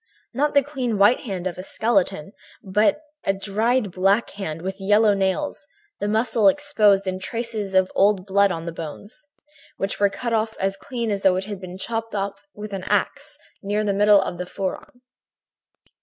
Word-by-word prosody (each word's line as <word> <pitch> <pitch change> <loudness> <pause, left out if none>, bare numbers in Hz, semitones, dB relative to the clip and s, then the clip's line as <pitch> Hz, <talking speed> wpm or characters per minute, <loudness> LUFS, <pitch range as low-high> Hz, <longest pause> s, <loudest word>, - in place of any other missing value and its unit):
Not 290 +4 0
the 280 - +6
clean 255 -6 -2
white 205 +5 +5
hand 190 -8 -5
of 180 -1 -3
a - - -5
skeleton, 195 -5 0 0.3
but 210 +9 +2 0.2
a 195 - +1
dried 215 +3 0
black 195 +5 +2
hand, 165 -5 -6
with 190 +1 -5
yellow 210 +2 +4
nails, 200 +10 -1 0.3
the 205 - -1
muscles 220 -1 +3
exposed 210 -9 +2
and 185 0 -3
traces 220 -2 -4
of 190 0 +3
old 195 -2 +3
blood 200 0 +3
on 165 -1 -4
the 170 - -3
bones, 205 - -8 0.5
which 195 - -3
were 200 0 +4
cut 235 +3 -4
off 220 0 0
as 195 0 0
clean 235 +1 -4
as 200 -1 -2
though 190 -2 +4
it 190 +1 -2
had 200 -2 -7
been 185 0 -8
chopped 225 +2 -4
off 200 0 -1 0.2
with 210 0 -7
an 190 -2 -4
axe, - - -1 0.2
near 205 +1 -1
the 205 -1 0
middle 205 0 +5
of 175 -2 -5
the 180 - -4
forearm. 195 +7 -6
200 Hz, 185 wpm, -23 LUFS, 190-225 Hz, 0.5 s, the